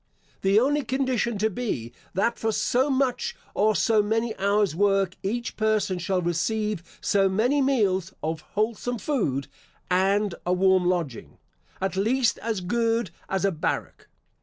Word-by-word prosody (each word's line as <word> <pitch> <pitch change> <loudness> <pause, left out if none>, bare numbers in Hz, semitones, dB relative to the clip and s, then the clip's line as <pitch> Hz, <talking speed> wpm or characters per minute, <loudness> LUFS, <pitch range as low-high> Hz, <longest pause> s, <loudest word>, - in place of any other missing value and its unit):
The 195 +2 +4
only 290 +5 +2
condition 255 -3 0
to 215 +2 +1
be, 150 - -3 0.2
that 230 +5 +1
for 225 - 0
so 255 +5 +1
much, 260 -2 0 0.2
or 215 +1 +2
so 220 -2 +3
many 225 +2 -1
hours' 200 -3 +2
work, 195 -1 +2
each 235 +5 -3
person 215 -4 +1
shall 185 0 -1
receive 210 +3 -1 0.2
so 195 -1 +3
many 245 +9 +2
meals 200 -9 +1
of 160 0 -2 0.2
wholesome 230 +3 0
food, 195 - -1 0.4
and 195 +2 +2
a 180 - +1
warm 185 -1 +3
lodging, 165 -9 -3 0.4
at 190 0 -2
least 230 +5 +1
as 220 -4 -2
good 230 +1 0 0.2
as 190 +1 0
a 195 - +3
barrack. 160 -3 -3
205 Hz, 145 wpm, -25 LUFS, 190-235 Hz, 0.4 s, The